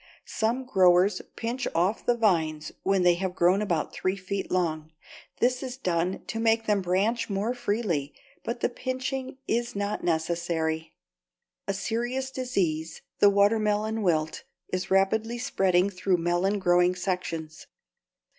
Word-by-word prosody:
Some 235 +4 -1
growers 185 -4 +4
pinch 240 +3 -3
off 180 +6 +1
the 240 -1 +2
vines 160 -8 +1
when 195 -1 +2
they 175 0 +6
have 185 -1 -2
grown 180 +4 +3
about 175 -7 -1
three 185 +1 -1
feet 195 0 -4
long. 160 -4 -1 0.5
This 250 +1 +2
is 255 -2 -5
done 180 -5 -1
to 225 - -4
make 225 0 +2
them 210 -2 +2
branch 195 +7 0
more 205 +4 -1
freely, 205 - -2 0.3
but 235 0 -4
the - - +2
pinching 260 +1 -4
is 235 0 -1
not 205 +1 -2
necessary. 160 -1 -1 0.7
A 195 - 0
serious 240 +6 -2
disease, 175 -12 -2 0.2
the 205 - +7
watermelon 210 +2 +2
wilt, 160 -5 0 0.3
is 185 +1 -3
rapidly 220 +5 +2
spreading 190 -5 +2
through 185 -1 +1
melon 175 +4 +1
growing 180 -1 +3
sections. 175 -4 -4
195 Hz, 135 wpm, -27 LUFS, 175-225 Hz, 0.7 s, the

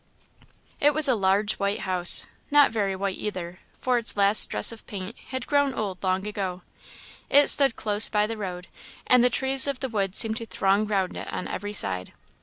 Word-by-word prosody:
It 295 +1 +2
was 310 -1 +4
a 260 - +3
large 205 0 +1
white 200 +1 -2
house; 180 -2 +3 0.2
not 290 -1 +4
very 200 -4 -2
white 195 0 -4
either, 185 -4 -6 0.2
for 250 -1 0
its 225 - -2
last 200 +1 +5
dress - - +4
of 230 - -12
paint 200 +2 -8
had 260 -1 -5
grown 285 -2 0
old 195 -4 -5
long 190 +1 -1
ago. 190 -3 -5 0.7
It 285 +1 +5
stood 275 -5 +3
close 210 0 +2
by 210 0 +1
the 225 +1 -5
road, 185 -4 -7 0.4
and 250 -1 +4
the 250 - +4
trees 265 +2 +2
of 275 -2 -3
the 265 - -4
wood 200 -4 -3
seemed 220 0 +1
to 230 -2 -7
throng 200 +1 0
round 195 -3 -2
it - - -7
on - - -5
every 205 +2 -6
side. 95 - -2
210 Hz, 200 wpm, -24 LUFS, 190-250 Hz, 0.7 s, last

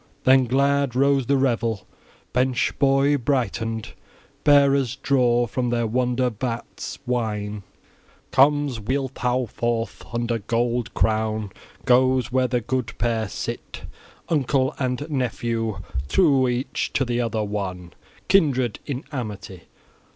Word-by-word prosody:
Then 130 0 +5
glad 140 +1 +1
rose 140 -1 +3
the 140 0 +3
revel; 115 -5 0 0.5
bench 125 0 +1
joy 140 +1 +4
brightened. 115 -4 -2 0.5
Bearers 140 -3 +4
draw 125 -3 +2
from 125 +1 -2
their 120 -1 0
"wonder 125 +2 0
vats" 115 +1 -5
wine. 105 -4 -2 0.7
Comes 145 -2 +3
Wealhtheow 130 +1 -1
forth, 115 +1 -2
under 120 0 -1
gold 115 +1 -1
crown 110 -2 0 0.3
goes 130 0 +3
where 130 0 +2
the 125 0 0
good 120 0 -3
pair 115 -3 0
sit, - - -6 0.4
uncle 135 -2 +1
and 130 +2 -2
nephew, 115 -6 -2 0.3
true 140 - +4
each 125 +2 -2
to 135 - +1
the 120 0 0
other 115 -2 -1
one, 95 -4 -4 0.3
kindred 130 - +2
in 140 -1 -3
amity. 105 - -6
125 Hz, 115 wpm, -23 LUFS, 115-135 Hz, 0.7 s, Then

